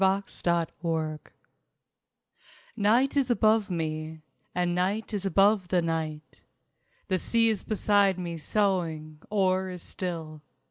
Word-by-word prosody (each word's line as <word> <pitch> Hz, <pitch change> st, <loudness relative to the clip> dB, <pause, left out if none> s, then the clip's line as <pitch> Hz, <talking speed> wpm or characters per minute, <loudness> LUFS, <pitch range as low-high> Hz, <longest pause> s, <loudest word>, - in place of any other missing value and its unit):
SOMNAMBULISM 170 Hz, -4 st, -1 dB
I -, -, -21 dB, 1.5 s
Night 235 Hz, +7 st, +3 dB
is 275 Hz, -3 st, +2 dB
above 220 Hz, -3 st, +3 dB
me, 155 Hz, -2 st, -3 dB, 0.3 s
And 175 Hz, -1 st, +1 dB
Night 195 Hz, +5 st, -1 dB
is 200 Hz, -1 st, -1 dB
above 195 Hz, +1 st, +3 dB
the 175 Hz, -1 st, +1 dB
night. 155 Hz, -2 st, -4 dB, 0.7 s
The 185 Hz, -2 st, 0 dB
sea 230 Hz, +3 st, +2 dB
is 215 Hz, -3 st, -1 dB
beside 205 Hz, -3 st, +2 dB
me 170 Hz, -2 st, -4 dB
soughing, 160 Hz, -4 st, -1 dB
or 190 Hz, -2 st, +1 dB
is 180 Hz, -2 st, -7 dB
still. 160 Hz, -4 st, -5 dB
185 Hz, 120 wpm, -27 LUFS, 165-205 Hz, 1.5 s, Night